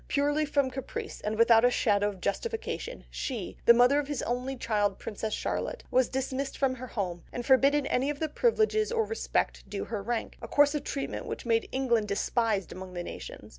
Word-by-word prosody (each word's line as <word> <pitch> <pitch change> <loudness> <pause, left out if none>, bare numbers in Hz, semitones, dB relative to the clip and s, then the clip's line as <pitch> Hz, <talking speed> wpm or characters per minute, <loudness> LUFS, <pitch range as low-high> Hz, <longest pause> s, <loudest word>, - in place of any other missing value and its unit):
Purely 290 +1 +1
from 280 -2 +1
caprice, 265 -1 -6
and 215 +1 -2
without 230 0 +6
a 245 - +6
shadow 205 -4 +2
of 195 -2 -9
justification, 455 - -3
she, 240 -9 -4
the - - +9
mother 250 +4 +5
of 290 - -3
his 290 -3 -3
only 250 +2 -2
child 210 -4 0
Princess 215 0 -4
Charlotte, - - -3
was 255 -1 +3
dismissed 265 +1 -3
from 270 -2 +2
her 255 0 -7
home, 180 -7 -3
and 240 - -5
forbidden 275 +2 +4
any 270 +1 +1
of 295 - -2
the 315 - -1
privileges 435 +4 +2
or 455 -2 +1
respect 450 - -2
due 200 0 -3
to - - -10
her 215 -3 -2
rank, 230 +3 -3
a 230 - -6
course 290 +4 +4
of 295 -2 -2
treatment 275 - -4
which - - -5
made 230 -1 +1
England 240 -5 +1
despised 205 -1 0
among 185 0 -8
the 175 - -3
nations. - - -8
255 Hz, 205 wpm, -29 LUFS, 220-285 Hz, -, the